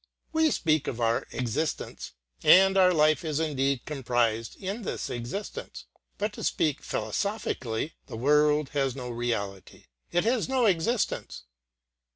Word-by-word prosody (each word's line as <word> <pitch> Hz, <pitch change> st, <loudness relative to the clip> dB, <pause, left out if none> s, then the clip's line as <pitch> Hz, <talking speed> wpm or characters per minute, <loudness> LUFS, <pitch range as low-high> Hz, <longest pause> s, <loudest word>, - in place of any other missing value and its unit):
We 320 Hz, 0 st, +4 dB
speak 155 Hz, -, +1 dB
of 120 Hz, -, -3 dB
our 115 Hz, 0 st, +1 dB
existence, 125 Hz, +6 st, -3 dB, 0.3 s
and 190 Hz, +4 st, +7 dB
our 185 Hz, -1 st, +6 dB
life 155 Hz, -3 st, +3 dB
is 155 Hz, -2 st, -1 dB
indeed 140 Hz, -4 st, 0 dB
comprised 120 Hz, -5 st, 0 dB
in 200 Hz, +4 st, -5 dB
this 205 Hz, -, -4 dB
existence, 125 Hz, -, -6 dB, 0.3 s
but 210 Hz, 0 st, -2 dB
to -, -, -7 dB
speak 150 Hz, -3 st, 0 dB
philosophically 120 Hz, -, -2 dB
the -, -, -7 dB
world 150 Hz, +3 st, +3 dB
has 135 Hz, -3 st, 0 dB
no 125 Hz, -2 st, -5 dB
reality, 110 Hz, -5 st, -4 dB, 0.3 s
it 175 Hz, -, +2 dB
has 235 Hz, +2 st, +1 dB
no 260 Hz, -2 st, +2 dB
existence. 200 Hz, +4 st, 0 dB
150 Hz, 135 wpm, -28 LUFS, 120-190 Hz, 0.3 s, and